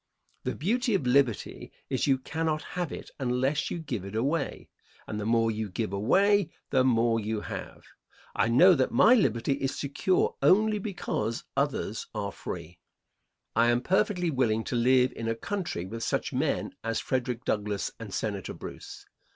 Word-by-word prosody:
The - - -1
beauty 230 - +1
of 150 - 0
liberty 125 -3 +1 0.2
is - - 0
you 135 -1 +4
cannot 160 +3 -2
have 180 -3 -2
it - - -8
unless 130 +3 0
you - - -3
give 135 - -4
it 100 +2 -7
away, 140 +6 -1 0.4
and 105 - -4
the 105 - -3
more 115 0 +3
you 110 -1 -3
give 105 +1 -3
away 195 - +3 0.2
the 130 -2 +4
more 115 -2 +3
you 110 0 -2
have. - - -7 0.5
I - - +2
know 155 +11 +7
that 130 -5 +2
my 235 - +6
liberty 135 - +2
is 135 0 -1
secure 145 +6 +1
only 210 +8 +4
because 145 - -3
others 140 -6 -1
are 100 -2 -2
free. 85 -1 -7 0.8
I 115 +1 +4
am 120 0 +2
perfectly 180 +2 +1
willing 115 -5 +1
to - - -3
live 125 +1 +4
in 115 - -4
a 115 - 0
country 170 - -3
with 115 +4 -6
such - - -1
men - - -1
as 115 0 -1
Frederick 125 -2 -2
Douglass 105 -1 -1
and - - -8
Senator - - -3
Bruce. - - -9
125 Hz, 165 wpm, -28 LUFS, 115-160 Hz, 0.8 s, know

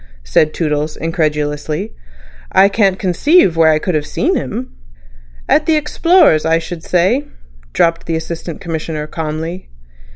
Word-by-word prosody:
said - - +2
Toodles 150 -1 -2
incredulously. 155 +2 -2 0.6
"I 195 +1 +5
can't 195 -2 +2
conceive 190 - +3
where 165 -1 +4
I 155 - +4
could 180 +3 -2
have 150 -1 -1
seen 355 +8 0
him." 250 -1 -4 0.8
"At 305 - +2
the 320 - +3
Explorers, 305 - +3
I 160 +1 +2
should 165 0 -6
say," 185 - +1 0.5
dropped 165 - +1
the 165 - -1
Assistant 165 0 -6
Commissioner 160 -2 -4
calmly. 160 +3 -5
165 Hz, 135 wpm, -16 LUFS, 155-195 Hz, 0.8 s, I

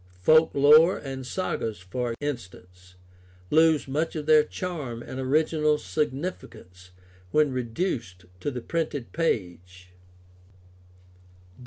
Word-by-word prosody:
Folk 155 - +5
lore 155 +5 +6
and 135 -2 -7
sagas, 115 - -3
for 115 +6 -4
instance, 90 -9 -8 0.6
lose 160 -2 +4
much 155 +5 -2
of 150 -2 -4
their 155 -1 +6
charm 150 -9 -5
and 130 - -7
original 150 +2 +1
significance 130 - -5 0.4
when 150 +5 +2
reduced 120 - -3
to 145 - -2
the 125 -3 -5
printed 150 -4 -3
page. 90 - -3
135 Hz, 105 wpm, -26 LUFS, 110-155 Hz, 0.6 s, lore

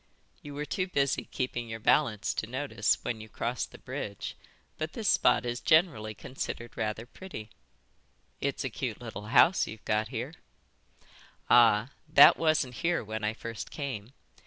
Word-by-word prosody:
"You 145 -1 -9
were 150 +1 -3
too 185 +5 -2
busy 140 -6 0
keeping 120 -2 -3
your 115 0 -5
balance 110 -2 +2
to 110 - -3
notice, 120 -4 0
when 110 -2 -3
you 110 - -11
crossed 120 +4 -3
the - - -11
bridge, 125 -6 -6 0.4
but 155 +1 -3
this 225 -3 -3
spot 125 - +4
is 120 0 -2
generally 150 - +3
considered 120 0 -6
rather 110 0 -2
pretty." 120 - -9 0.9
"It's - - -2
a - - -3
cute - - -4
little 105 +1 -7
house 165 - +5
you've 110 0 -9
got 110 +1 +1
here." 125 +5 -5 1.2
"Ah, 120 0 +6 0.2
that - - +9
wasn't 155 -6 +2
here 175 -3 0
when 110 0 -5
I 105 +1 0
first 115 -3 -6
came. 130 -5 -5
120 Hz, 160 wpm, -29 LUFS, 110-145 Hz, 1.2 s, that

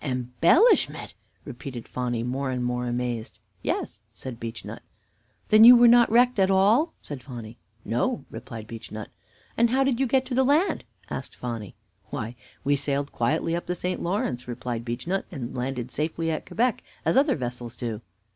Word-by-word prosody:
"Embellishment!" 130 - +3 0.3
repeated 125 -3 -7
Phonny, 120 -2 -2
more 130 +3 -2
and 125 -1 -1
more 125 0 -1
amazed. 120 -2 -3 0.2
"Yes," 100 - -2
said 125 -3 -7
Beechnut. 115 -1 -7 0.7
"Then 215 +1 +8
you 245 +2 +11
were 240 0 +7
not 240 0 +6
wrecked 245 0 +4
at 190 0 +4
all?" 215 - +4
said 145 -3 -7
Phonny. 120 -3 -9 0.3
"No," - - -1
replied 110 -2 -8
Beechnut. 110 -1 -8 0.5
"And 235 0 +4
how 265 +3 +3
did 265 -3 +1
you 270 - +2
get 265 +2 +2
to 260 - -5
the 260 +2 +4
land?" 295 +8 +2 0.3
asked - - -5
Phonny. 115 -5 -6 0.3
"Why, 120 -3 -4 0.3
we 145 +1 +3
sailed 140 0 -1
quietly 155 +7 0
up 175 - -4
the 180 - -1
St. 180 +1 -3
Lawrence," 170 - -2
replied 120 -1 -4
Beechnut, 145 +11 -2
"and 130 -7 -6
landed 125 -1 -3
safely 165 +2 -1
at 155 - -4
Quebec, 245 +2 +1 0.2
as - - +2
other 275 +2 +4
vessels 120 -3 -5
do." 115 -3 -4
135 Hz, 165 wpm, -26 LUFS, -, 0.7 s, you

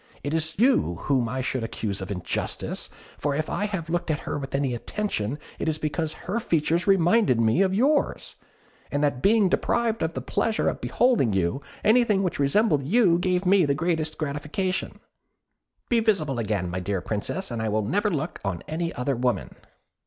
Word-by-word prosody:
It 145 - -2
is 160 +1 -1
you 240 - +3
whom 130 -5 +1
I 130 +2 -2
should 130 -1 -2
accuse 100 -3 -3
of 95 - -6
injustice: 90 -4 -3 0.3
for 145 -1 0
if 155 +1 -2
I 205 - 0
have 190 -6 -4
looked 175 +1 -2
at 155 -1 0
her - - -3
with 135 -1 -5
any 135 -2 0
attention, 125 - -3 0.2
it - - 0
is 155 - -1
because 155 0 -2
her 205 +6 -1
features 170 -2 0
reminded 185 - +4
me 115 +10 +3
of 190 -1 +3
yours, 275 +9 +1 0.6
and 145 0 0
that 140 -4 +1
being 210 0 +4
deprived 230 +4 0
of 160 0 -1
the - - -1
pleasure 225 -1 0
of - - -5
beholding 235 - +2
you, 95 +8 0 0.2
anything 220 -3 +4
which 180 - -2
resembled 150 +2 +3
you 180 - +3
gave 180 +1 0
me 190 0 +5
the 140 -2 +2
greatest 160 0 -1
gratification. 155 +6 -3 0.9
Be 235 - +3
visible 160 - +1
again, 105 -5 -1
my 90 - -2
dear 95 +1 -2
Princess, 110 - -3
and 115 -1 -3
I 110 - -1
will 110 +1 0
never 205 - +1
look 155 -2 -3
on 95 -4 -3
any 165 +2 -2
other 130 +2 -1
woman." 125 0 -1
155 Hz, 185 wpm, -25 LUFS, 125-195 Hz, 0.9 s, me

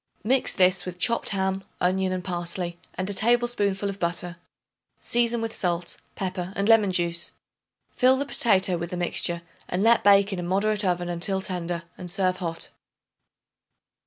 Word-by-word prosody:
Mix 255 +4 +2
this 185 0 +4
with 180 -1 -7
chopped 235 +6 +1
ham, 190 -1 -1 0.2
onion 185 +1 +1
and 185 -1 -3
parsley, 175 -1 -3 0.2
and 185 +1 -3
a 205 - 0
tablespoonful 215 -3 +1
of 200 0 -5
butter. 170 0 -2 0.6
Season 235 -1 +1
with 225 0 -3
salt, 175 -2 -2 0.2
pepper 185 -1 -4
and 200 +1 0
lemon 220 -4 +5
juice. 170 -1 0 0.6
Fill 260 +1 +4
the 280 - -2
potato 190 -8 +2
with 170 0 -4
the 180 - -4
mixture 175 -1 +1 0.2
and 180 +2 -1
let 230 +1 +4
bake 200 0 +5
in 185 - -3
a - - -2
moderate 200 +4 0
oven 175 -2 0
until 175 +3 0
tender 175 -3 -4 0.2
and 180 -1 -6
serve 185 0 0
hot. 165 -3 -4
190 Hz, 160 wpm, -25 LUFS, 175-205 Hz, 0.6 s, lemon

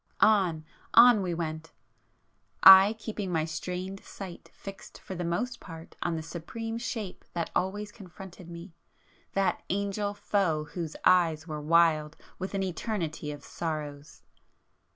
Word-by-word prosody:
On,—on 205 +4 +4
we 180 -3 -2
went,—I 160 - +3
keeping 210 -3 -5
my 160 -2 +1
strained 180 +4 -5
sight 185 -3 -9
fixed 195 -1 -10
for - - -8
the 175 -1 -4
most 210 +9 -2
part 165 -2 -11
on 165 - -1
the 160 - -4
supreme 225 +8 -6
Shape 220 -5 -5
that 170 -1 -3
always 205 +3 -1
confronted 185 -3 -12
me,—that 170 +2 -5
Angel 200 +1 -1
Foe 195 -6 0
whose 160 +1 -6
eyes 165 -4 +4
were 155 -3 -5
wild 155 -1 +3 0.2
with 190 +2 -4
an 195 - 0
eternity 170 -5 -3
of 145 -1 -9
sorrows! 150 -3 -6
180 Hz, 125 wpm, -29 LUFS, 160-200 Hz, 0.2 s, On,—on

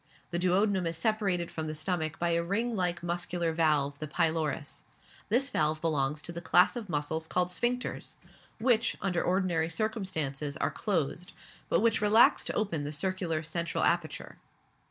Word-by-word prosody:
The 170 - 0
duodenum 185 0 +2
is 165 0 -1
separated 195 -3 0
from 160 -1 -4
the 155 - -4
stomach 155 0 -2
by 170 0 0
a 170 0 +2
ring 225 +7 -1
like 175 -3 -1
muscular 175 -1 -1
valve, 150 -3 +1
the 155 - -4
pylorus; 155 -2 -1 0.5
this 250 +6 +3
valve 155 - +1
belongs 150 -2 0
to - - -4
the 170 0 -6
class 180 +4 +4
of 225 -5 -6
muscles 160 +1 -2
called 180 +1 0
sphincters, 240 +7 -2 0.4
which, 235 -1 +2
under 180 -3 0
ordinary 180 -3 +1
circumstances, 160 -8 -2
are - - 0
closed, 180 -1 -2 0.4
but - - +3
which 225 -1 +2
relax 215 +2 +5
to - - -2
open 170 -9 -1
the 145 - -4
circular 165 0 -1
central 170 +2 -2
aperture. 170 -2 -1
170 Hz, 160 wpm, -30 LUFS, 155-195 Hz, 0.5 s, relax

